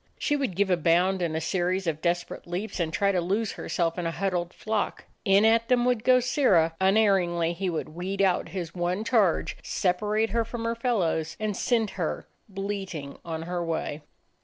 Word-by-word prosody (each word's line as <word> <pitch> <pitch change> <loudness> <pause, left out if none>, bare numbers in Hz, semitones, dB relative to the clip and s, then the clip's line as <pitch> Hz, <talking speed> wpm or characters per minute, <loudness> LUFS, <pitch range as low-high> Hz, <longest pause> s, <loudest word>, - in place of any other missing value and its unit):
She 295 - 0
would 265 -10 -2
give 200 0 +1
a 180 - +4
bound 175 +3 +2
and 165 -2 -1
a - - 0
series 185 +2 0
of 155 -2 -2
desperate 175 0 -2
leaps, 190 +4 -4
and 165 -2 0
try 200 +3 +2
to 180 -2 +1
lose 200 +5 0
herself 170 0 -2
in 170 - -1
a - - 0
huddled 175 -1 -2
flock. 215 +1 -3 0.2
In 200 +1 +5
at 230 +1 +4
them 245 -1 +3
would 245 -3 +1
go 255 -1 +5
Sirrah; 235 - +3
unerringly 190 -4 +3
he 185 +2 -2
would 165 -2 -3
weed 180 +5 -5
out 190 -2 +2
his 175 -4 -5
one 180 +3 -1
charge, 220 -8 +2
separate 210 +4 0
her 230 +1 +1
from 230 +1 -6
her 230 - +1
fellows, 185 -10 -1
and 215 -2 -1
send 225 0 +1
her - - -2 0.2
bleating 195 -7 -5
on 165 -1 -4
her 175 +1 -3
way. 160 -2 -3
190 Hz, 190 wpm, -27 LUFS, 170-215 Hz, 0.2 s, In